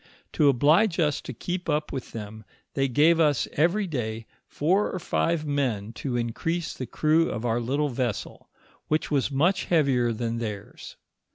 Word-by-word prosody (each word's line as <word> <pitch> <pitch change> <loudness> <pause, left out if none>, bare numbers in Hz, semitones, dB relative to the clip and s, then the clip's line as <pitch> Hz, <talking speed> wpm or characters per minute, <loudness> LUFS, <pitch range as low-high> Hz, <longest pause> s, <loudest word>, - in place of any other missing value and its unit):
To 145 - +4
oblige 160 - +3
us 150 -4 +1
to - - -7
keep 175 +8 -4
up 150 0 0
with 130 - -5
them, 110 0 -8 0.3
they 135 0 +1
gave 155 +6 +4
us 150 -5 +3
every 175 +7 +2
day 115 -8 -4 0.2
four 185 +8 +1
or - - -3
five 165 -2 0
men 125 -8 -1
to 125 0 -3
increase 160 +9 -2
the 130 - -6
crew 160 +2 +2
of 115 - -4
our 115 0 +1
little 140 +5 0
vessel, 120 -4 -4 0.4
which 155 +1 -1
was 140 -2 +1
much 170 +8 +1
heavier 135 -8 +2
than 115 0 -3
theirs. 105 -3 -7
140 Hz, 165 wpm, -26 LUFS, 120-165 Hz, 0.4 s, To